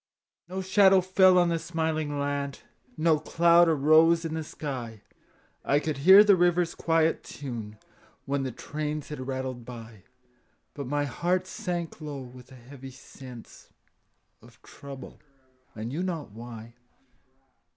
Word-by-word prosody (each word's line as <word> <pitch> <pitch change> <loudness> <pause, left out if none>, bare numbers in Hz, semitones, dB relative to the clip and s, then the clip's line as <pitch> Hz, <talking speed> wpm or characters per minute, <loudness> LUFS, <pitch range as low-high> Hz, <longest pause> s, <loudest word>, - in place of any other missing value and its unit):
No 190 +1 -4
shadow 190 0 +5
fell 185 0 +4
on 175 -1 +4
the 165 -1 0
smiling 160 -3 -2
land, 140 -1 -3 0.4
No 160 -1 +3
cloud 170 +2 +4
arose 160 +3 +4
in 160 - -4
the 160 0 -3
sky; 125 -8 -7 0.6
I 145 - +2
could 150 -2 -3
hear 190 +7 +8
the 205 -2 +5
river's 175 -1 +2
quiet 165 -1 +1
tune 115 -6 -7 0.5
When 140 0 -1
the 130 -1 -3
trains 150 +3 -5
had 130 -4 -6
rattled 130 -2 -4
by; 115 -4 -11 0.7
But 140 -3 -6
my 145 +2 -1
heart 175 +7 -1
sank 175 -5 -5
low 150 -2 -6
with 125 +1 -14
a - - -12
heavy 135 +2 -12
sense 125 -2 -13 0.7
Of - - -19
trouble, 140 -2 -11 0.6
I 110 - -6
knew 135 +9 -4
not 170 - -4
why. 115 +1 -10
150 Hz, 140 wpm, -27 LUFS, 130-170 Hz, 0.7 s, hear